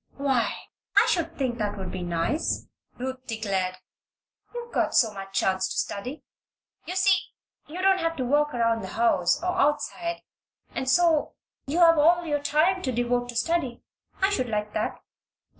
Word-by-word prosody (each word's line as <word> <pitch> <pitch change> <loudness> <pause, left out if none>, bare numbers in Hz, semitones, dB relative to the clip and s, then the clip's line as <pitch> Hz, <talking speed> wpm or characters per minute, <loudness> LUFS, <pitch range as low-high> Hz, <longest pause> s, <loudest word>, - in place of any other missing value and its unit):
"Why, 270 -4 +1 0.5
I - - +8
should 340 -3 -1
think 250 -3 -1
that 205 -1 -2
would 190 -1 -5
be 185 - -5
nice," 175 - -1 0.3
Ruth 260 +1 -5
declared. 195 -5 -1 0.8
"You've 475 -1 -8
got - - +1
so 220 -3 +4
much 195 -1 -9
chance 190 0 +1
to - - -5
study. 250 +9 -3 0.6
You 365 - -4
see, 380 0 +4 0.5
you 350 +5 -6
don't 385 -1 +4
have 330 0 -1
to 260 - -2
work 295 +3 +2
around 230 -2 +1
the - - -6
house, 185 -7 +3
or 360 - +1
outside, 340 +4 0 0.5
and 260 0 -2
so 325 0 +3 0.3
you 295 +5 -1
have 330 -2 +7
all 345 +3 +4
your 295 -2 -1
time 310 +6 +2
to 260 - -1
devote 245 0 0
to 240 - -6
study. 265 -1 -1 0.4
I 390 - +4
should 255 -11 -1
like 210 -1 -2
that." - - -3
260 Hz, 170 wpm, -26 LUFS, 225-330 Hz, 0.8 s, I